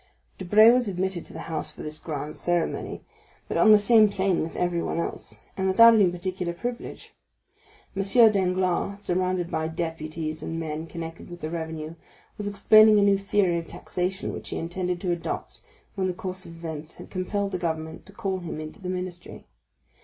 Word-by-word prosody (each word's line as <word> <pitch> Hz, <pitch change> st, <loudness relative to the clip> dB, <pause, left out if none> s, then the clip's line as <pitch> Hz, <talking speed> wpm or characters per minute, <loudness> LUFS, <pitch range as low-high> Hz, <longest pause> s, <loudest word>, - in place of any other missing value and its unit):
Debray 215 Hz, +5 st, +7 dB
was 245 Hz, -1 st, +2 dB
admitted 190 Hz, -2 st, -2 dB
to -, -, -12 dB
the -, -, -7 dB
house 165 Hz, -1 st, -4 dB
for -, -, -10 dB
this 155 Hz, 0 st, -4 dB
grand 150 Hz, -1 st, -5 dB
ceremony, 175 Hz, -2 st, -2 dB, 0.4 s
but -, -, -4 dB
on 220 Hz, -, +5 dB
the 215 Hz, -, +9 dB
same 215 Hz, 0 st, +5 dB
plane 190 Hz, -2 st, +1 dB
with 160 Hz, -, -4 dB
everyone 175 Hz, -1 st, -1 dB
else, -, -, -5 dB
and 190 Hz, 0 st, -1 dB
without 230 Hz, +5 st, +8 dB
any 205 Hz, -5 st, +5 dB
particular 180 Hz, 0 st, -3 dB
privilege. 240 Hz, +7 st, -6 dB, 0.8 s
M. 195 Hz, -, 0 dB, 0.3 s
Danglars, 185 Hz, 0 st, 0 dB
surrounded 180 Hz, -2 st, -1 dB
by 160 Hz, 0 st, -1 dB
deputies 160 Hz, -1 st, -4 dB
and 165 Hz, +1 st, -4 dB
men 160 Hz, 0 st, -4 dB
connected 165 Hz, 0 st, -8 dB
with 175 Hz, 0 st, -10 dB
the 155 Hz, -, -4 dB
revenue, 160 Hz, -1 st, -5 dB, 0.4 s
was 205 Hz, -, -5 dB
explaining 215 Hz, +1 st, +6 dB
a 205 Hz, -, +5 dB
new 200 Hz, -1 st, +4 dB
theory 195 Hz, -3 st, +1 dB
of 165 Hz, -, -8 dB
taxation 180 Hz, +2 st, -3 dB
which -, -, -7 dB
he -, -, -4 dB
intended 180 Hz, +1 st, -3 dB
to 180 Hz, -, -1 dB
adopt 170 Hz, -1 st, -4 dB, 0.3 s
when 190 Hz, -2 st, -1 dB
the 185 Hz, -, -1 dB
course 185 Hz, +1 st, -5 dB
of 165 Hz, -, -11 dB
events 160 Hz, -1 st, -7 dB
had -, -, -12 dB
compelled 200 Hz, +2 st, -2 dB
the 185 Hz, -, -2 dB
government 160 Hz, -1 st, -4 dB
to -, -, -11 dB
call 195 Hz, -2 st, -3 dB
him 170 Hz, -3 st, -6 dB
into 155 Hz, +6 st, -8 dB
the 180 Hz, -, -5 dB
ministry. 180 Hz, -1 st, -6 dB
180 Hz, 185 wpm, -26 LUFS, 165-195 Hz, 0.8 s, the